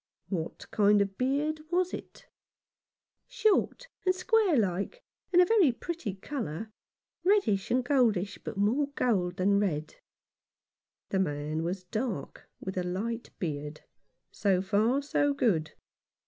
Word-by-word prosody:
" - - -45
What 170 -4 -4
kind 205 0 +4
of 200 0 +2
a - - -28
beard 280 +8 0
was 360 +1 +1
it? - - -8 0.3
" - - -65
" - - -65 0.2
Short, - - +1 0.2
and 370 -1 +2
square 415 - +3
like, 200 - -1 0.3
and 355 - +5
a 360 - +8
very 375 - +5
pretty 245 - -5
colour 215 - -5 0.3
— - - -60
reddish 220 - +2
and 250 0 +1
goldish, 220 -8 +2
but - - -6
more 235 +9 +2
gold 180 -7 +1
than 200 +2 +3
red." 160 -7 -2 1.1
The 190 - 0
man 150 -2 -1
was 180 +3 -3
dark, 210 - -4
with 190 0 -4
a - - -1
light 220 +6 -3
beard. 150 -2 -4 0.5
So 195 -3 +2
far, 215 +8 +2
so 290 0 +1
good. 180 - +1
210 Hz, 145 wpm, -29 LUFS, 185-285 Hz, 1.1 s, a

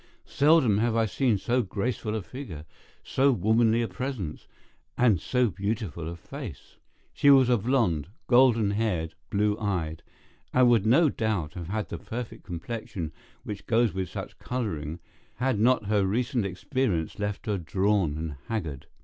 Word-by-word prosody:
Seldom 140 -8 +4
have 115 0 +1
I 115 -1 +3
seen 115 +2 +1
so 125 +6 +1
graceful 110 +2 -2
a 110 - -3
figure, 90 - -8 0.4
so 135 +1 +3
womanly 115 0 +3
a - - -1
presence, 125 - -5 0.5
and 110 -9 +4
so 125 -2 +1
beautiful 100 -5 -3
a 85 - -6
face. 110 - -9 0.4
She 145 - +4
was 135 -3 +7
a 120 - +4
blonde, 100 - +1 0.2
golden 120 -5 +4
haired, 100 -7 -1 0.2
blue 105 +1 +1
eyed, 85 -7 -2 0.5
and 130 -1 +5
would 110 -3 +3
no 150 +7 +5
doubt 105 - -1
have 90 -4 -6
had 105 +3 -3
the - - -5
perfect 120 0 -6
complexion 90 -2 -5 0.3
which 105 -1 -7
goes 115 -1 +3
with 95 -1 -3
such - - -7
colouring, 85 - -3 0.4
had 125 -2 0
not 120 0 +3
her 105 -1 +2
recent 115 +2 0
experience 95 - -2
left 105 +3 -3
her 105 -4 -1
drawn 95 -2 +1
and 80 -3 -5
haggard. 80 - -4
110 Hz, 155 wpm, -27 LUFS, 90-120 Hz, 0.5 s, was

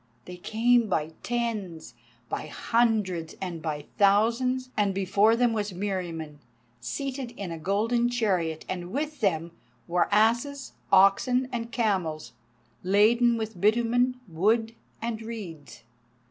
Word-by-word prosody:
They 180 0 -9
came 230 +5 +2
by 160 -4 -1
tens, 210 - -3 0.3
by - - -4
hundreds, 210 -8 0
and 175 -4 -5
by 150 -2 -4
thousands, 235 +6 +2
and 200 -2 +1
before 200 +3 +3
them 240 -1 +2
was 210 -2 -2
Meriamun, 175 -6 -4 0.4
seated 265 - -4
in 190 -4 -5
a 165 - -6
golden 225 +7 +1
chariot, 185 -10 -1
and 175 -1 -4
with 300 +4 -3
them 170 -5 0 0.4
were 175 0 +1
asses, 235 +7 +1 0.2
oxen, 200 +7 +4
and 235 -1 -4
camels, 185 -10 -1 0.5
laden 230 +5 +4
with 220 -5 -5
bitumen, 240 +4 +2
wood, 220 +7 +1 0.3
and 230 -1 -3
reeds. 190 - -8
210 Hz, 120 wpm, -27 LUFS, 180-235 Hz, 0.5 s, oxen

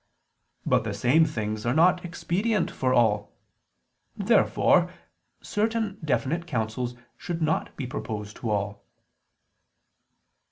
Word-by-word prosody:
But - - +3
the 105 -3 -3
same 125 +10 +4
things 110 -7 -3
are 120 +2 0
not 175 +2 +4
expedient 185 +4 -1
for 130 -1 0
all. 105 -4 +2 0.8
Therefore - - +3 0.5
certain 215 -1 -1
definite 155 +3 0
counsels 120 -2 -2 0.2
should 170 -1 -4
not 160 -1 -1
be 135 - -3
proposed 105 -4 -5
to 115 - -4
all. 100 -1 -2
130 Hz, 110 wpm, -26 LUFS, 110-170 Hz, 0.8 s, same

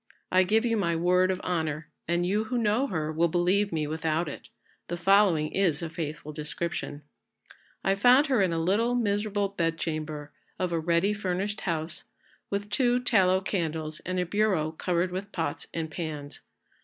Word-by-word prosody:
I 185 - +5
give 220 +5 +2
you 230 -1 +1
my 170 -5 +1
word 180 +2 +3
of 185 -1 0
honour, 160 -4 -2 0.2
and 175 +1 +1
you 210 +4 +1
who 245 +3 -2
know 230 +4 +2
her 155 - -2
will 165 +2 +2
believe 180 +4 +2
me 155 -2 -1
without 160 +2 -1
it, 145 - -8 0.4
the 175 - -3
following 175 -4 +4
is 175 -5 +1
a 165 - -4
faithful 155 -2 -5
description: 150 -1 -4 0.8
I 195 - +3
found 245 +8 +6
her 260 -7 +2
in 185 -3 +2
a 165 - -1
little 205 +9 +2
miserable 205 -3 0
bedchamber 155 -4 -3 0.3
of 185 -2 -1
a 165 - +1
ready 170 +5 +2
furnished 200 0 -2
house, 165 -2 -3 0.4
with 205 +1 -3
two 245 +2 +3
tallow 190 -7 +3
candles 160 -5 -2
and 185 0 -3
a 180 - +1
bureau 185 -5 +1
covered 175 +2 -1
with 195 +3 -5
pots 160 -4 -3
and 160 -2 -4
pans. 150 -3 -5
180 Hz, 170 wpm, -28 LUFS, 160-200 Hz, 0.8 s, found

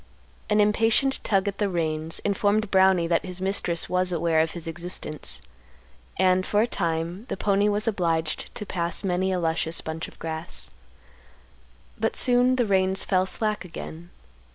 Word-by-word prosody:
An 210 0 +3
impatient 225 +6 +3
tug 195 -2 +1
at 200 -1 -3
the 205 -2 +1
reins 160 -2 -1
informed 205 +1 +1
Brownie 190 -2 +4
that 165 0 +1
his 185 -1 -7
mistress 190 -3 -1
was 180 0 0
aware 170 -1 +1
of 160 0 +1
his 170 -2 -7
existence, 160 - -3 0.7
and, 185 0 +3
for 210 +3 +2
a - - +3
time, 170 -1 -2
the - - -4
pony 200 +1 +2
was 210 +2 +1
obliged 165 -6 0
to 210 - -4
pass 170 -1 -2
many 190 0 0
a 185 - 0
luscious 165 0 0
bunch 160 +1 -5
of - - -16
grass. 160 +1 -5 1.3
But 225 +1 0
soon 250 +1 +3
the 245 -2 +2
reins 190 -1 +1
fell 185 -1 +1
slack 210 0 -1
again. 170 -1 -9
185 Hz, 160 wpm, -25 LUFS, 165-205 Hz, 1.3 s, Brownie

